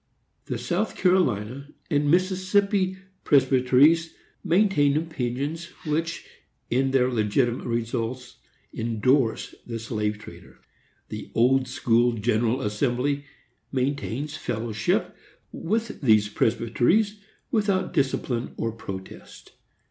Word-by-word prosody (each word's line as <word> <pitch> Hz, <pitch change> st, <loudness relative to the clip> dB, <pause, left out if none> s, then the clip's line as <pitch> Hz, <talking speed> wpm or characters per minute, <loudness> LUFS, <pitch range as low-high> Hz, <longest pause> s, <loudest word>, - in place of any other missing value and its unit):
The -, -, -3 dB
South -, -, -2 dB
Carolina 140 Hz, -, +1 dB, 0.2 s
and 145 Hz, -1 st, +2 dB
Mississippi 185 Hz, +2 st, +2 dB, 0.3 s
Presbyteries 135 Hz, +4 st, +4 dB, 0.3 s
maintain 170 Hz, -6 st, +3 dB
opinions 155 Hz, +1 st, -3 dB, 0.2 s
which, 165 Hz, +2 st, -2 dB, 0.5 s
in 130 Hz, +3 st, +2 dB
their 130 Hz, -1 st, +2 dB
legitimate 120 Hz, +2 st, 0 dB
results, 120 Hz, +1 st, -3 dB, 0.4 s
endorse 115 Hz, +2 st, +1 dB
the 115 Hz, -1 st, -4 dB
slave 105 Hz, -2 st, -2 dB
trader. 105 Hz, -, -13 dB, 0.5 s
The -, -, -7 dB
Old 130 Hz, +3 st, +3 dB
School 120 Hz, -1 st, +2 dB
General 115 Hz, +2 st, 0 dB
Assembly 125 Hz, +6 st, -1 dB, 0.5 s
maintains 140 Hz, +1 st, -2 dB
fellowship 110 Hz, -5 st, -1 dB, 0.4 s
with 220 Hz, +5 st, -3 dB
these 110 Hz, -5 st, +4 dB
Presbyteries, 120 Hz, -, +1 dB, 0.3 s
without 200 Hz, -5 st, +1 dB
discipline 135 Hz, -5 st, -1 dB
or 115 Hz, -, -1 dB
protest. 95 Hz, -4 st, -9 dB
130 Hz, 95 wpm, -25 LUFS, 115-160 Hz, 0.5 s, Presbyteries